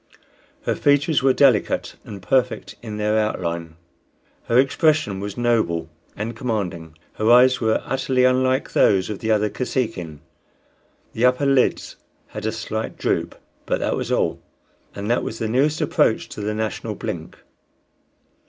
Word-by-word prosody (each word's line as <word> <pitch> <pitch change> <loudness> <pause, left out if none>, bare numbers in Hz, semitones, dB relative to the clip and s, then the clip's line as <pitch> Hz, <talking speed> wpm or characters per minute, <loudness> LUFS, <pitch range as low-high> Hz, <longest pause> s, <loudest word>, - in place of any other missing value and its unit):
Her - - 0
features 145 +1 +2
were 135 0 +4
delicate 130 -4 +2
and 100 -3 -10
perfect 125 +1 0
in 110 -3 -6
their 105 +1 +1
outline; 85 -6 -3 0.7
her 120 - +2
expression 135 - +2
was 100 +3 -6
noble 110 -9 0 0.2
and 110 +3 -4
commanding. 90 -10 -4 0.2
Her 110 +1 +1
eyes 125 +1 +6
were 110 -1 +1
utterly 130 -1 0
unlike 130 +1 +2
those 95 0 +3
of 105 - -5
the 110 - -3
other 105 -1 +3
Kosekin; 95 - -3 0.9
the 115 - +1
upper 125 +3 +3
lids 135 -2 +1 0.3
had 105 0 -5
a - - 0
slight 110 0 -4
droop, - - -1 0.3
but - - +1
that - - 0
was - - -4
all, - - 0 0.5
and 100 +1 -5
that 120 - +2
was 110 - -5
the 115 - -2
nearest 145 +7 +1
approach 140 -6 +1
to - - -7
the 105 +1 -2
national 110 -2 -3
blink. - - -6
110 Hz, 150 wpm, -22 LUFS, 105-130 Hz, 0.9 s, eyes